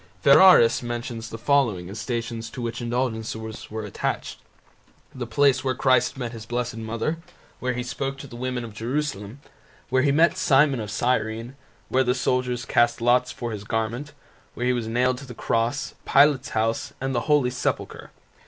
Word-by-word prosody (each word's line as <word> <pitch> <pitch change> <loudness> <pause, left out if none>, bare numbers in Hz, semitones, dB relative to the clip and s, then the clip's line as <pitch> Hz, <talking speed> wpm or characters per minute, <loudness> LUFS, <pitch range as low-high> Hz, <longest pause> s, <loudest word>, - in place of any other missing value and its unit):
Ferraris 140 -5 +7
mentions 120 -1 -5
the 115 - -6
following 115 -8 +1
as 100 +3 -7
Stations 115 -1 -4
to - - -9
which 120 0 -4
indulgences 110 -2 -3
were 110 0 -5
attached: 105 - -3 0.7
the 125 -2 -5
place 130 +2 +3
where 130 -1 0
Christ 130 -1 +2
met 120 -3 -4
His 115 -2 -9
Blessed 120 0 -3
Mother, 115 +8 -2 0.4
where 125 0 -1
He 125 0 -3
spoke 135 +2 -4
to 140 - -9
the 125 - -11
women 125 0 -3
of 110 - -10
Jerusalem, 120 -1 -3 0.5
where 130 0 +3
He 140 +1 +3
met 165 +5 +4
Simon 140 -6 +3
of 105 -2 -5
Cyrene, 115 +1 -1 0.3
where 130 +1 +3
the 125 0 +1
soldiers 125 -1 -1
cast 120 0 +2
lots 125 +2 +3
for 120 -1 -5
His 105 -2 -6
garment, 115 +7 -3 0.4
where 120 - -2
He 125 - +3
was 120 -2 -2
nailed 125 +2 +1
to 140 - -11
the 125 - -9
cross, 115 +6 -1
Pilate's 140 0 +4
house, 110 -1 -1
and 135 0 -2
the 120 +3 -2
Holy 145 -4 +3
Sepulchre. 125 - -3
120 Hz, 175 wpm, -24 LUFS, 115-130 Hz, 0.7 s, Ferraris